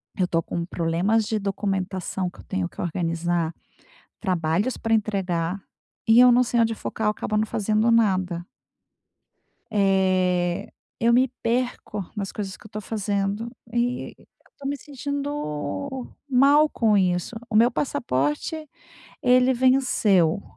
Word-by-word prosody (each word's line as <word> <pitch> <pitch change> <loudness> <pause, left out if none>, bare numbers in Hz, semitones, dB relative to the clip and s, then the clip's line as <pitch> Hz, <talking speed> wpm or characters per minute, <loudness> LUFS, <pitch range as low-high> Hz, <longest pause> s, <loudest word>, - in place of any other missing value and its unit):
Eu 185 -4 +1
tô 165 -1 +1
com 170 +1 -4
problemas 180 +7 +1
de 215 0 -1
documentação 190 -2 -2
que - - -18
eu - - -11
tenho 90 -2 -2
que - - -8
organizar, 170 -1 -1 0.7
trabalhos 180 +4 0
pra 225 - -1
entregar 195 -4 0 0.5
e 225 +2 +7
eu 250 0 +8
não 245 +1 +5
sei 240 -1 0
onde 225 -1 +2
focar, 220 0 -3
eu - - +4
acabo 215 0 -2
não 215 - +2
fazendo 215 +1 +1
nada. 185 -6 +2 1.3
Eh, 185 -3 +1 0.3
eu 230 +1 +3
me 255 +2 +5 0.2
perco 230 -5 -2
nas 200 -2 -3
coisas 195 -3 -5
que - - -19
eu - - -11
tô 215 - -4
fazendo, 205 +1 -2 0.2
eh, 240 +1 -1
eu - - -21 0.3
tô 280 - -12
me 285 - -2
sentindo 280 - -4 0.2
mal 280 +4 +5
com 220 -6 +2
isso. 180 +3 0
O 220 - -3
meu 230 +3 +6
passaporte, 240 - -1 0.6
ele 250 +1 +4
venceu, 215 -9 +3
210 Hz, 140 wpm, -24 LUFS, 180-240 Hz, 1.3 s, eu